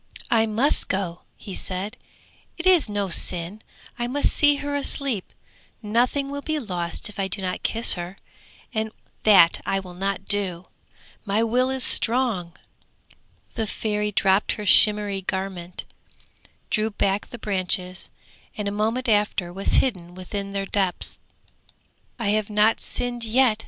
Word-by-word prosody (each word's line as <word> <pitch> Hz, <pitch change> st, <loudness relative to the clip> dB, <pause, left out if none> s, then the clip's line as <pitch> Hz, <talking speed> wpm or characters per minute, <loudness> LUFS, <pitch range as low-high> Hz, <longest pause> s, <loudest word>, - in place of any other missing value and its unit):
'I 225 Hz, -1 st, +3 dB
must 230 Hz, +7 st, +3 dB
go,' 185 Hz, -3 st, -2 dB, 0.2 s
he 200 Hz, -, -9 dB
said, 195 Hz, +6 st, -3 dB, 0.6 s
'it 340 Hz, -, -5 dB
is 360 Hz, -10 st, +5 dB
no 205 Hz, -2 st, -2 dB
sin; 180 Hz, +4 st, -1 dB, 0.4 s
I 240 Hz, -, -1 dB
must 285 Hz, +4 st, +1 dB
see 290 Hz, -1 st, +4 dB
her 285 Hz, 0 st, -4 dB
asleep; 275 Hz, -7 st, -1 dB, 0.5 s
nothing 245 Hz, +6 st, 0 dB
will 285 Hz, 0 st, -4 dB
be 310 Hz, +1 st, -2 dB
lost 180 Hz, -, -4 dB
if 210 Hz, -1 st, -11 dB
I 195 Hz, -, 0 dB
do 190 Hz, +2 st, -2 dB
not 185 Hz, -1 st, -3 dB
kiss 230 Hz, +1 st, +4 dB
her, 175 Hz, +2 st, -6 dB, 0.6 s
and 220 Hz, -1 st, -2 dB, 0.3 s
that 190 Hz, -5 st, +5 dB
I 195 Hz, -, -1 dB
will 185 Hz, -2 st, -10 dB
not 195 Hz, +1 st, -3 dB
do. 190 Hz, -4 st, 0 dB, 0.6 s
My 210 Hz, +2 st, 0 dB
will 250 Hz, +3 st, +1 dB
is 265 Hz, -1 st, +2 dB
strong.' 225 Hz, -10 st, +4 dB, 1.0 s
The 225 Hz, -2 st, -2 dB
Fairy 210 Hz, 0 st, -2 dB
dropped 195 Hz, 0 st, +2 dB
her 210 Hz, -, -6 dB
shimmering 205 Hz, -2 st, +4 dB
garment, 190 Hz, -2 st, -4 dB, 0.9 s
drew 215 Hz, 0 st, +1 dB
back 200 Hz, -1 st, -1 dB
the 240 Hz, -, -8 dB
branches, 185 Hz, -3 st, -2 dB, 0.5 s
and 210 Hz, -1 st, -3 dB
a -, -, -1 dB
moment 225 Hz, +5 st, -1 dB
after 205 Hz, -5 st, +1 dB
was 195 Hz, +2 st, -1 dB
hidden 175 Hz, -8 st, -5 dB
within 200 Hz, +2 st, -6 dB
their 195 Hz, 0 st, -3 dB
depths. 195 Hz, -2 st, -2 dB, 1.0 s
'I 230 Hz, -5 st, -2 dB
have 215 Hz, 0 st, 0 dB
not 210 Hz, +1 st, +2 dB
sinned 245 Hz, -1 st, -3 dB
yet!' 230 Hz, -1 st, +2 dB
210 Hz, 145 wpm, -23 LUFS, 190-230 Hz, 1.0 s, is